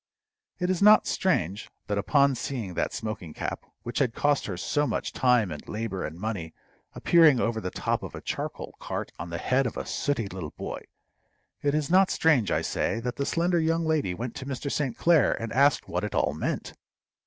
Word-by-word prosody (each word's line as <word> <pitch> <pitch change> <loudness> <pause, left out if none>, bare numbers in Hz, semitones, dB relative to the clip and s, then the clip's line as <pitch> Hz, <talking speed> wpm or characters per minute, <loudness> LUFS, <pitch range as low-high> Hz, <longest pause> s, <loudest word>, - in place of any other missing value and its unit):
It 180 0 0
is 185 - -1
not 210 +1 +7
strange 100 - 0 0.2
that 100 0 -1
upon 140 +6 +3
seeing 120 -7 -4
that - - -1
smoking 110 -8 -5
cap, - - -4 0.2
which 120 - -3
had 125 -5 +1
cost 145 -1 +1
her 90 -4 -4
so 145 +11 0
much - - -2
time 125 -7 +3
and 75 - -8
labor 105 -3 -3
and 80 - -5
money, 95 -6 -4 0.4
appearing 160 -7 +5
over 115 -1 0
the 90 - -3
top - - -1
of - - -7
a - - -7
charcoal - - -5
cart - - -4
on 85 +1 -5
the 85 - -3
head 130 +7 +1
of - - -6
a - - -3
sooty 140 -7 -1
little 90 -5 -7
boy - - -6 0.8
it 145 0 +1
is 155 +1 -1
not 190 +1 +5
strange, 135 - +3
I - - +1
say, 115 - -1
that 125 +1 -4
the 140 - -1
slender 170 +1 +1
young 165 +1 +1
lady 150 - 0
went 120 +2 -5
to 130 - -7
Mr. 140 +1 -4
St. 135 -6 -1
Clair 160 - +4
and 115 -1 -4
asked 140 +2 +3
what 90 +2 -2
it 105 - -3
all - - +2
meant. - - -3
125 Hz, 205 wpm, -27 LUFS, 100-150 Hz, 0.8 s, not